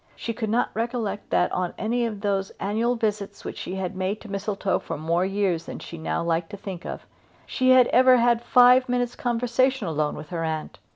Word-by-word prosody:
She 230 - -4
could 220 -1 -3
not 235 +3 +1
recollect 225 -2 -3
that, 180 - +2
on 180 -1 -2
any 235 +2 0
of 210 -3 -6
those 195 -2 0
annual 225 +5 0
visits 205 -3 -3
which - - -6
she 185 - -5
had 190 0 -4
made 190 +3 -2
to 215 - -10
Mistletoe 200 0 -1
for - - -6
more 165 +3 0
years 195 -4 0
than - - -6
she 170 - -9
now 160 +1 -2
liked 165 0 -1
to 205 - -8
think 190 -3 -7
of, - - -7 0.4
she 255 0 0
had 255 -1 +7
ever 255 0 +6
had 235 -1 +3
five 250 +1 +5
minutes' 245 -1 0
conversation 245 0 0
alone 155 -2 -1
with 150 - -9
her 170 -2 -3
aunt. 160 -1 -4
205 Hz, 210 wpm, -25 LUFS, 185-240 Hz, 0.4 s, had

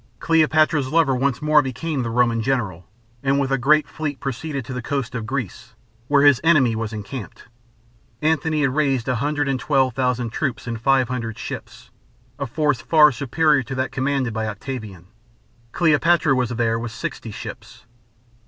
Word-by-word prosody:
Cleopatra's 155 -3 +2
lover 160 -4 +3
once 135 +2 -1
more 150 0 +5
became 140 +2 -3
the 120 - -3
Roman 120 -1 +2
general, 110 -9 -2 0.3
and 140 0 +1
with 135 -1 -1
a 135 - +3
great 150 +4 +3
fleet 145 -3 -5
proceeded 140 0 -4
to 130 - -6
the 125 - -4
coast 135 0 -3
of 115 -3 -4
Greece, 130 -6 -5 0.3
where 145 0 +4
his 145 -4 +5
enemy 140 -9 +4
was 110 -1 -3
encamped. 110 +1 -7 0.8
Antony 155 +1 +1
had 135 -3 +1
raised 135 -5 0
a 125 -2 0
hundred 145 +3 -1
and 135 -2 0
twelve 130 -1 +1
thousand 125 -2 -1
troops 130 0 -3
and 115 -2 -5
five 135 0 +3
hundred 115 -3 -4
ships - - -8 0.5
a 140 - -2
force 150 +1 0
far 150 -2 +5
superior 140 +3 +2
to 130 +2 -6
that 130 +1 -2
commanded 135 -2 -1
by 110 -1 -2
Octavian. 110 -4 -7 0.7
Cleopatra 160 -2 +3
was 125 -2 0
there 115 -1 0
with 115 -1 -5
sixty - - -6
ships. - - -9
135 Hz, 170 wpm, -22 LUFS, 120-150 Hz, 0.8 s, more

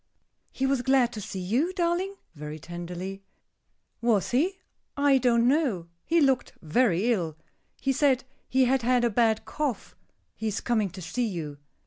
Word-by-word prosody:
"He 265 - -1
was 270 -2 +2
glad 250 -1 +3
to 215 - -5
see 190 - -5
you, 245 - 0
darling?" 360 +2 0 0.2
very 150 -1 -7
tenderly. 175 +4 -6 0.8
"Was 230 -5 +2
he? 340 +10 +1 0.4
I 280 -1 +4
don't 235 -1 +3
know. 250 - +1 0.2
He 335 +1 +4
looked 270 -4 +2
very 205 +5 +2
ill. 165 -7 -3 0.4
He 270 - +1
said 265 -2 +3 0.3
he 260 0 +4
had 260 +1 +2
had 245 +1 +2
a 240 - +2
bad 225 0 +2
cough. 285 -8 -3 0.4
He 220 - -4
is 210 -1 -1
coming 220 -4 0
to 185 +1 -9
see 240 +8 -1
you." 155 -7 -5
240 Hz, 160 wpm, -27 LUFS, 190-270 Hz, 0.8 s, I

